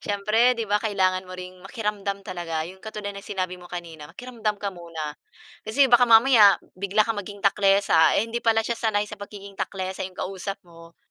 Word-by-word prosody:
Siyempre, 215 +5 +2
'di 230 - -2
ba, 210 0 +1
kailangan 185 -4 0
mo 185 - -8
ring 185 0 -9
makiramdam 200 -1 -4
talaga. 170 -4 -4
'Yong 185 +3 -11
katulad 210 -1 -6
ng 200 - -8
sinabi 185 -2 -4
mo 175 - -13
kanina, 165 -4 -8
makiramdam 225 +1 -4
ka 200 -1 -4
muna. 165 -4 -6 0.5
Kasi 265 +5 +2
baka 240 0 +6
mamaya, 225 -3 +7 0.2
bigla 200 +3 +1
kang 225 -2 -2
maging 205 +1 -10
taklesa, 195 -4 +4
eh, 205 - +2
hindi 230 +1 -4
pala 225 -1 +2
siya 235 +1 -2
sanay 210 -3 +1
sa 210 -1 -10
pagiging 200 -1 -10
taklesa 190 -1 -4
'yong 185 - -21
kausap 195 +1 -4
mo. 165 -1 -16
200 Hz, 190 wpm, -24 LUFS, 185-215 Hz, 0.5 s, mamaya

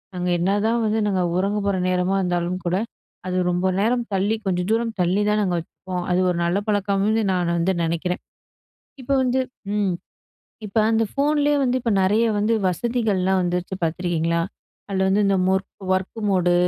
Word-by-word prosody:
நாங்க 180 0 -2
என்னதான் 205 +6 +1
வந்து 220 +1 +1
நாங்க 190 -3 +1 0.2
உறங்க 200 +3 0
போற 200 -1 +1
நேரமா 180 +1 +1
இருந்தாலும் 180 0 -1
கூட, 175 +1 +1 0.5
அது 185 0 -1
ரொம்ப 180 +1 -1 0.2
நேரம் 240 +2 +1
தள்ளி 200 +3 +1
கொஞ்சம் 180 -1 0
தூரம் 230 0 0
தள்ளி 180 +3 +2
தான் 210 0 +2
நாங்க 180 -2 0
வச்சுப்போம். 180 +2 -6
அது 180 - +2
ஒரு 170 - -2
நல்ல 175 +3 +1
பழக்கம்னு 205 +2 +1
நான் 175 -2 0
வந்து 175 +3 +1
நெனைக்கிறேன். 170 +2 -2 0.8
இப்ப 265 - -5
வந்து 255 +1 +1 0.4
ம். 200 -3 +1 0.7
இப்ப 205 +1 -5
அந்த 225 0 +3
ஃபோன்லயே 295 +1 +2
வந்து 255 -1 +1
இப்ப 230 - 0
நெறைய 210 +5 +3
வந்து 215 +2 +2
வசதிகள்லாம் 190 -2 0
வந்துருச்சு 180 +1 -2
பார்த்துருக்கீங்களா? 170 0 0 0.5
அதுல 190 -1 0
வந்து 195 +2 +3
இந்த 195 -1 +2
மொர்க் 190 +1 -2
ஒர்க் 190 +4 -4
மோடு 180 -2 +2
190 Hz, 160 wpm, -22 LUFS, 180-215 Hz, 0.8 s, அந்த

